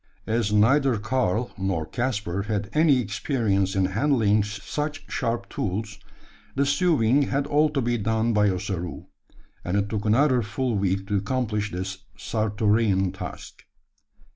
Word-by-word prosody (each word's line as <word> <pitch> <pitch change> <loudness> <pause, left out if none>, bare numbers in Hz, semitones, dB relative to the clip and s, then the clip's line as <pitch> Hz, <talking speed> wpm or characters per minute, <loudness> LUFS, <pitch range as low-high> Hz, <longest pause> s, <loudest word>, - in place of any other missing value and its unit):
As 110 -2 0
neither 125 +4 +4
Karl 110 0 0
nor 95 -5 -1
Caspar 105 -5 -2
had 105 -1 -3
any 155 -3 +4
experience 100 -3 0
in 95 -1 +2
handling 110 0 +2
such 145 +9 -4
sharp 115 0 -2
tools, 105 +2 -4 0.6
the 140 +1 +2
sewing 145 -4 +3
had 140 +1 0
all 150 +1 +3
to 145 -2 -1
be 120 0 0
done 110 +2 +1
by 105 -1 +3
Ossaroo; 90 -2 -4 0.6
and 90 +3 -1
it 100 0 0
took 105 -1 -3
another 125 +3 +3
full 115 +4 -2
week 95 -1 0
to 100 0 0
accomplish 105 0 -1
this 95 +1 -4 0.2
Sartorean 105 -2 +1
task. - - -8
110 Hz, 140 wpm, -25 LUFS, 100-125 Hz, 0.6 s, neither